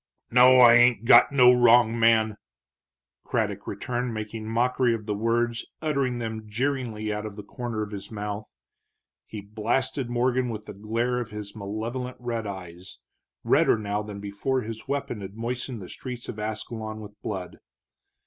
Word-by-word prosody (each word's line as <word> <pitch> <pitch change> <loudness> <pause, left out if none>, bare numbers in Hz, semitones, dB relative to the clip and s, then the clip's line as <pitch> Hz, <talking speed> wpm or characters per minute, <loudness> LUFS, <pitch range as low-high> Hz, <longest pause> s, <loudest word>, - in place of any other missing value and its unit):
"No, 125 +2 +7
I 120 -1 +9
ain't 120 -2 +5
got - - +7
no 125 -3 +7
wrong 120 -1 +5
man!" 110 -2 +4 0.9
Craddock 105 -4 -2
returned, 120 +3 -3
making 110 0 -5
mockery 120 +1 +2
of 105 -2 -8
the 105 - -1
words, 115 +2 0 0.2
uttering 140 -5 0
them 110 -2 -5
jeeringly 115 -3 -2
out 105 0 -4
of 105 -2 -7
the 105 - -8
corner 120 -3 -4
of 105 - -7
his 100 -2 -7
mouth. 105 0 -5 0.8
He 105 - -7
blasted 120 +5 -2
Morgan 125 +1 +1
with 105 -2 -6
the - - -8
glare 115 +5 -1
of 120 -2 -5
his 105 -1 -8
malevolent 115 +5 -5
red 115 -3 -3
eyes, 90 -2 -8 0.5
redder - - +4
now 105 -1 -2
than 105 -1 -7
before 100 +6 -2
his 115 +3 -7
weapon 135 -6 -3
had 95 +1 -8
moistened 120 -1 -4
the - - -9
street 125 -2 -7
of 110 - -6
Ascalon 110 0 -5
with 105 -1 -12
blood. 95 -4 -5
115 Hz, 160 wpm, -26 LUFS, 105-125 Hz, 0.9 s, I